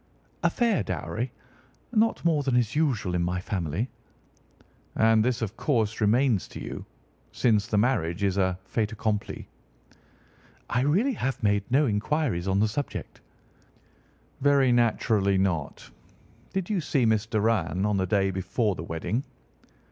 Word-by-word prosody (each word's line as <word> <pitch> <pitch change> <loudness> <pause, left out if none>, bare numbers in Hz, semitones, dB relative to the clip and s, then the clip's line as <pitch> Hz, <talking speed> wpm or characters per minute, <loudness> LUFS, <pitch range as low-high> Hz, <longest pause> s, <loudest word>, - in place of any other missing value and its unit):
"A - - +3
fair 235 -5 +1
dowry. 120 +3 -3 0.6
Not 225 -5 +2
more 160 -3 +3
than 135 -3 0
is 120 0 +1
usual 125 - +1
in 90 - +1
my 90 +1 -1
family." 90 - -2 1.1
"And 110 -1 +4
this, 120 -1 0
of 110 0 -4
course, 115 -6 0
remains 115 0 +2
to - - -9
you, - - -7 0.4
since 105 -4 +2
the 105 - 0
marriage 100 -6 +1
is 95 -2 +1
a 95 -2 +1
fait 105 +2 -1
accompli?" 105 -1 -3 1.2
"I 125 - +2
really 190 - +2
have 135 - -3
made 100 -1 +2
no 140 +4 +4
inquiries 110 - 0
on 95 +1 +2
the 110 - +3
subject." 140 +7 -5 1.2
"Very 140 -2 +4
naturally 110 -4 +2
not. 85 -7 -2 0.6
Did 190 -2 -2
you 200 -5 0
see 140 -4 +1
Miss 110 -1 +2
Doran 105 -5 +1
on 105 -1 +1
the 95 -1 0
day 95 0 +2
before 95 +3 -1
the 85 - -7
wedding?" 85 +10 -2
110 Hz, 145 wpm, -27 LUFS, 95-130 Hz, 1.2 s, And